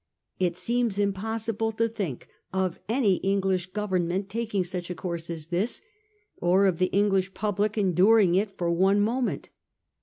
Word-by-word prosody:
It 180 -2 0
seems 235 0 0
impossible 220 +2 -1
to 230 +1 +1
think 195 - -5 0.2
of 190 -2 -1
any 220 -6 +3
English 190 -2 0
Government 190 -1 -1
taking 215 -2 -1
such 175 0 -4
a 180 - -4
course 170 -1 -5
as 165 -2 -6
this; 185 +7 -1 0.5
or 185 +3 +3
of 185 -4 +1
the 185 - +3
English 195 -1 +1
public 210 +1 -1
enduring 195 0 +4
it 195 +2 0
for 170 -1 0
one 190 +4 +3
moment. 235 +5 -1
195 Hz, 150 wpm, -26 LUFS, 180-215 Hz, 0.5 s, enduring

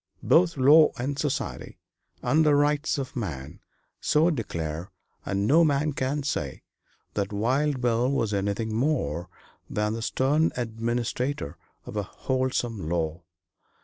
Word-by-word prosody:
Both 170 -2 +4
law 150 +4 +7
and 140 +3 -3
society, 145 -1 -3 0.5
and 155 +2 +3
the 150 -2 +4
rights 145 +2 +2
of 135 -2 -5
man, 80 - -5 0.4
so 160 +3 +3
declare, 85 - -4 0.4
and 100 0 0
no 160 +9 +5
man 150 -1 +2
can 135 +2 -1
say 75 - -3 0.5
that 100 -1 -2
Wild 130 +6 +1
Bill 120 +1 +2
was 115 -6 0
anything 100 +3 -1
more 95 - 0 0.4
than 105 0 0
the 115 - -4
stern 145 +7 +2
administrator 120 - -2 0.3
of - - -8
a 105 - +1
wholesome 120 -4 -2
law. 85 0 -1
125 Hz, 130 wpm, -26 LUFS, 100-145 Hz, 0.5 s, law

